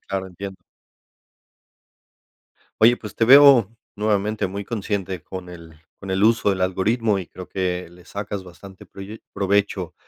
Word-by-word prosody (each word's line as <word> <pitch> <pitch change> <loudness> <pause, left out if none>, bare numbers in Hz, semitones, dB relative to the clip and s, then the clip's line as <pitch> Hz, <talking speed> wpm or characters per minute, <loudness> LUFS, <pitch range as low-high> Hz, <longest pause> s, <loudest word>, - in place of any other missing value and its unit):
Claro, 95 -1 -3
entiendo. 95 +1 -8 2.2
Oye, 120 +2 +6
pues 105 - -9
te 115 - +3
veo 130 -4 +7 0.2
nuevamente 105 0 0
muy 100 +2 -5
consciente 100 -5 -3
con 95 +1 -8
el 80 -3 -13 0.2
con 95 - -8
el 95 +1 0
uso 110 -1 +3
del 95 -1 -2
algoritmo, 100 +3 +1
y 90 - -6
creo 90 +1 -11
que 90 -1 -3
le 90 +1 -18
sacas 100 0 -6
bastante 95 +2 -13
proye 100 +3 -10
provecho. 100 -2 0
95 Hz, 145 wpm, -22 LUFS, 95-105 Hz, 2.2 s, veo